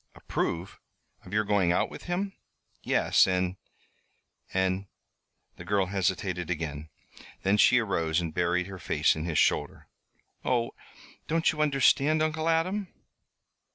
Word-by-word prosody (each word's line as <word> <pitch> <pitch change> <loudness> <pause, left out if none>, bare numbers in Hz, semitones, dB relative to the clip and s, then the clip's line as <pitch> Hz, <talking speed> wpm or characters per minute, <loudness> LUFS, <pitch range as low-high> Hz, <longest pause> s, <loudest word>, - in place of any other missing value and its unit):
"Approve? 90 +3 -3 0.5
Of 90 - -12
your 105 +1 +2
going 100 -4 +2
out 90 - +1
with - - -10
him?" 195 +3 -2 0.5
"Yes, - - +3
and 90 0 0 1.0
and 95 +1 0 0.3
" - - -49
The - - -9
girl 95 +1 +1
hesitated 95 -2 -1
again. 80 -3 -4 0.5
Then 100 +2 +3
she 125 - +6
arose 85 -8 +1
and 85 -3 -4
buried 90 +1 +1
her 95 0 -9
face - - +2
on 80 +1 -4
his 80 -3 -2
shoulder. - - +1 0.6
"Oh! 120 -2 0 0.6
don't 165 +1 +2
you 155 - -3
understand, 150 +1 +3
Uncle 155 +1 0
Adam?" 185 +5 0
95 Hz, 135 wpm, -28 LUFS, 90-140 Hz, 1.0 s, she